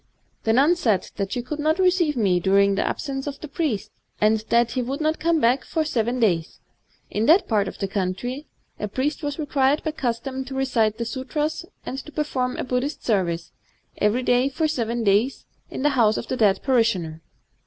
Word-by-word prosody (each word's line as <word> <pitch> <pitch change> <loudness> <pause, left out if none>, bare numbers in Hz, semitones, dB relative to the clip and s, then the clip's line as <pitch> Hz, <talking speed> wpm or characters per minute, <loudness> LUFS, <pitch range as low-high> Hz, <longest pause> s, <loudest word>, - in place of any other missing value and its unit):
The 225 - +3
nun 285 +8 +5
said 220 - 0
that 195 -1 -2
she 245 -2 -2
could 300 +5 -5
not 310 +2 +2
receive 360 -6 +2
me 190 -6 +2
during 200 +2 +3
the 195 - 0
absence 270 -1 -3
of 285 -1 -5
the 310 - -7
priest, 260 - -2 0.3
and 215 +1 +3
that 235 0 +3
he 255 - -1
would 265 +3 -3
not 310 0 0
come 335 0 +2
back 250 +1 +3
for 320 -2 -1
seven 240 -3 0
days.... 175 -8 0 0.5
In 215 +3 0
that 350 +5 +5
part 205 -4 +1
of - - -7
the 195 - -2
country, 205 +9 -3 0.3
a 210 - -2
priest 265 +8 -2
was 290 -2 -3
required 285 -2 +1
by 315 - -1
custom 260 -1 -3
to 265 +1 -7
recite 235 -5 +1
the 235 - -3
sutras 295 +7 -3 0.2
and 265 - -4
to 300 - -10
perform 260 -5 -2
a - - -2
Buddh 250 0 0
ist 295 - -6
service, 175 -6 0 0.5
every 215 +5 +2
day 250 +2 +3
for 310 +3 0
seven 235 -5 -1
days, 215 +6 +2 0.2
in - - -5
the 295 - +4
house 230 -6 +3
of - - -5
a - - +1
dead 205 -5 +2
parishioner. 200 - +1
250 Hz, 205 wpm, -23 LUFS, 215-290 Hz, 0.5 s, nun